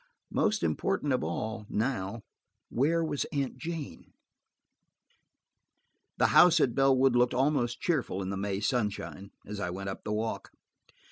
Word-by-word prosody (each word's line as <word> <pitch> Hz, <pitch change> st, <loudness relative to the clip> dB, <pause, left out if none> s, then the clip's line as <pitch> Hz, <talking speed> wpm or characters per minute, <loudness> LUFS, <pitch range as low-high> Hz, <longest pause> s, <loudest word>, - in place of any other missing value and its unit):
Most 215 Hz, 0 st, +1 dB
important 185 Hz, -8 st, 0 dB
of 125 Hz, -, 0 dB
all 105 Hz, +6 st, -4 dB
now–where 120 Hz, -, -2 dB
was 145 Hz, -3 st, -1 dB
Aunt 140 Hz, -4 st, -3 dB
Jane? 165 Hz, 0 st, -6 dB, 2.0 s
The -, -, +4 dB
house 175 Hz, -2 st, +7 dB
at 130 Hz, -5 st, +2 dB
Bellwood 135 Hz, -1 st, +4 dB
looked 120 Hz, 0 st, +3 dB
almost 125 Hz, -3 st, +1 dB
cheerful 125 Hz, -, 0 dB
in 95 Hz, -, -3 dB
the -, -, -2 dB
May 100 Hz, 0 st, -2 dB
sunshine, 105 Hz, -4 st, -2 dB, 0.2 s
as 105 Hz, 0 st, -6 dB
I 90 Hz, -, -2 dB
went 95 Hz, +2 st, -5 dB
up 95 Hz, -, -7 dB
the 105 Hz, -, -4 dB
walk. 110 Hz, +1 st, -2 dB
120 Hz, 135 wpm, -29 LUFS, 105-140 Hz, 2.0 s, house